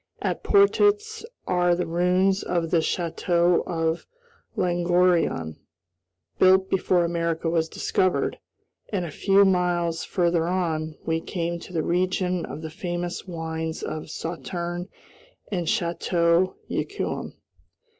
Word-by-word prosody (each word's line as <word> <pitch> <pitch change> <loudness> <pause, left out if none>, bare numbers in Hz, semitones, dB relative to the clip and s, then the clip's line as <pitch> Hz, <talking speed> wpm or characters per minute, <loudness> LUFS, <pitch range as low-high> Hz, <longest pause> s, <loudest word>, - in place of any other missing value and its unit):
At - - -2
Portets 415 +2 +3 0.2
are 175 -1 +2
the 180 - -1
ruins 180 +3 +2
of 170 -2 -1
the 170 - +4
Château 170 +1 +1
of 165 -1 -1 0.5
Langoiran, 175 - +2 0.8
built 190 0 +5
before 180 -2 +2
America 170 -1 -1
was 160 -1 +1
discovered, 185 +2 0 0.5
and, 190 -4 -1
a 165 - -6
few 195 +6 +4
miles 175 -3 +1
farther 170 -2 +1
on, 160 -4 -1
we 160 0 0
came 170 -1 -3
to - - -11
the 165 -3 -1
region 180 0 0
of 155 - -7
the 160 - -5
famous 175 +1 -4
wines 160 -2 -4
of 155 0 -5
Sauterne 175 +2 -4 0.6
and 175 -4 -2
Château 170 -2 +1
Yquem. - - -3
175 Hz, 115 wpm, -25 LUFS, 165-185 Hz, 0.8 s, built